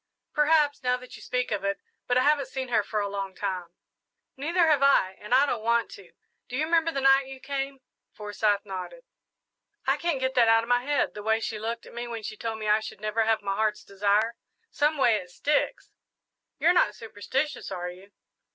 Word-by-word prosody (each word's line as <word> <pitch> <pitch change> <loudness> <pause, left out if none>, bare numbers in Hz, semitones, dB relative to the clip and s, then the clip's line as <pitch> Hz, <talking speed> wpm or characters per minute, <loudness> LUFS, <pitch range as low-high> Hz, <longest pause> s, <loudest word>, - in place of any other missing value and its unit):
"Perhaps, 300 -1 +3
now 250 -1 +1
that 250 0 -12
you - - -12
speak 250 -1 -2
of 205 -2 -1
it; 200 0 0 0.3
but 245 - +2
I 255 - +4
haven't 290 -1 +3
seen 260 -1 -5
her 230 -3 +3
for 210 +1 -2
a 200 - -1
long 195 -1 -4
time." 185 -3 -3 0.7
"Neither 335 +6 +2
have 300 -3 +3
I, 275 -9 +4
and 210 - -10
I 265 +3 +6
don't 240 -6 -2
want 235 +1 +1
to. 195 -3 -13 0.4
Do 250 - -4
you 310 - +1
remember 330 0 +2
the 275 - -2
night 270 0 +5
you 265 0 -9
came?" 275 0 -4 0.3
Forsyth 205 0 -1
nodded. 195 - -7 0.8
"I - - +2
can't 335 -5 -1
get 260 0 -1
that 240 -3 +4
out 225 0 +5
of 230 - -8
my 245 0 +4
head 285 +2 0
the 210 - -7
way 220 +1 +1
she 220 -1 -4
looked 230 +2 -4
at - - -13
me 240 +1 -5
when 230 -2 -6
she 215 - -5
told 225 0 -4
me 215 -1 -5
I 210 +1 +4
should 220 - -8
never 215 +2 0
have 220 0 +1
my 195 0 -1
heart's 215 0 0
desire. 205 +3 +1 0.4
Someway, 285 -7 +3
it 180 -3 -8
sticks." 290 +11 -1 0.7
"You're 345 - +4
not 210 -12 +3
superstitious, 250 +5 -3
are 180 -1 -4
you?" 185 +3 -15
235 Hz, 215 wpm, -27 LUFS, 210-275 Hz, 0.8 s, I